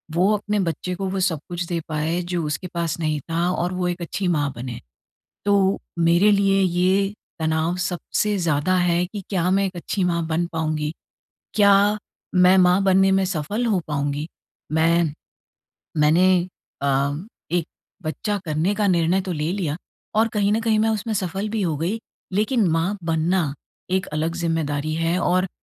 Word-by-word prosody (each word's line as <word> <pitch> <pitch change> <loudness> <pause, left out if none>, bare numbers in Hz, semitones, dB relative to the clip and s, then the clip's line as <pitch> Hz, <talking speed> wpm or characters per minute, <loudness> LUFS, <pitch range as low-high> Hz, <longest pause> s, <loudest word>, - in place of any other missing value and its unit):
वो 190 +4 +4
अपने 210 0 -1
बच्चे 180 0 -2
को 195 +1 -3
वो 195 - -2
सब 165 -6 0
कुछ 175 0 -2
दे 170 -1 -1
पाएँ 160 +3 -1
जो 170 -2 0
उसके 150 +5 -3
पास 170 -1 -2
नहीं 155 -2 0
था 170 +2 +1
और 180 0 -1
वो 180 -1 -1
एक 175 0 -3
अच्छी 175 +3 -2
माँ 145 -5 +1
बने। 120 0 -6 0.7
तो 205 0 +4 0.4
मेरे 170 +5 +4
लिए 195 -1 +3
ये 185 +3 +2 0.3
तनाव 160 +2 0
सबसे 205 +3 -1
ज़्यादा 170 +1 +1
है 175 -1 +2
कि 205 +1 -7
क्या 180 -2 +1
मैं 195 +1 +3
एक 185 -2 -6
अच्छी 185 +2 -2
माँ 170 -2 0
बन 165 +2 0
पाऊँगी? 155 -1 -1 0.6
क्या 205 0 +5 0.4
मैं 180 +1 +6
माँ 180 +1 +5
बनने 190 0 +4
में 190 0 +3
सफल 190 +7 -2
हो 210 -5 +2
पाऊँगी? 145 +1 -2 0.4
मैं 165 0 +2 0.9
मैंने 175 +5 +5 0.5
अ, 140 +1 +1 0.4
एक 175 -2 +1 0.4
बच्चा 170 +7 -2
करने 160 +6 0
का 205 -1 +1
निर्णय 175 +1 +2
तो 185 - -4
ले 155 +1 -1
लिया 170 -6 -2 0.4
और 225 +1 +4
कहीं 205 -1 +2
न 220 - +2
कहीं 225 -1 +2
मैं 220 +1 +3
उसमें 220 +1 -1
सफल 195 +1 -2
भी 220 -1 -1
हो 165 -4 0
गई, 185 +8 -1 0.3
लेकिन 215 0 +2
माँ 170 +5 0
बनना 165 -1 +1 0.4
एक 190 +1 +1
अलग 155 +2 -2
ज़िम्मेदारी 155 -3 -1
है। 165 +2 +1
और 185 +1 +2
175 Hz, 170 wpm, -23 LUFS, 160-195 Hz, 0.9 s, मैं